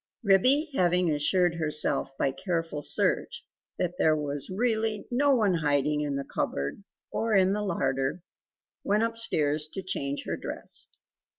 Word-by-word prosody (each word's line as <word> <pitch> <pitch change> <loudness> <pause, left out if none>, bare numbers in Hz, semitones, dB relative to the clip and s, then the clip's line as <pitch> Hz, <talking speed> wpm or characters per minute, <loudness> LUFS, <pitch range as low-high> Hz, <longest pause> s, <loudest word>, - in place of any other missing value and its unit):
Ribby 255 - +4
having 180 -5 +2
assured 175 +4 +2
herself 150 -3 +1
by 135 - +1
careful 165 -2 -3
search - - 0 0.3
that 180 0 -2
there 155 -1 +4
was 145 -2 -3
really 220 +1 -1
no 275 +3 +3
one 210 -6 +2
hiding 150 -2 +1
in 145 -2 -2
the 140 - -2
cupboard 70 - -3 0.3
or 225 -1 0
in 190 0 +4
the 210 - -1
larder 135 -5 -1 0.6
went 210 +2 +2
upstairs 155 -10 0
to 190 +5 -7
change 140 -6 -2
her - - -2
dress. - - -4
175 Hz, 140 wpm, -28 LUFS, 145-210 Hz, 0.6 s, Ribby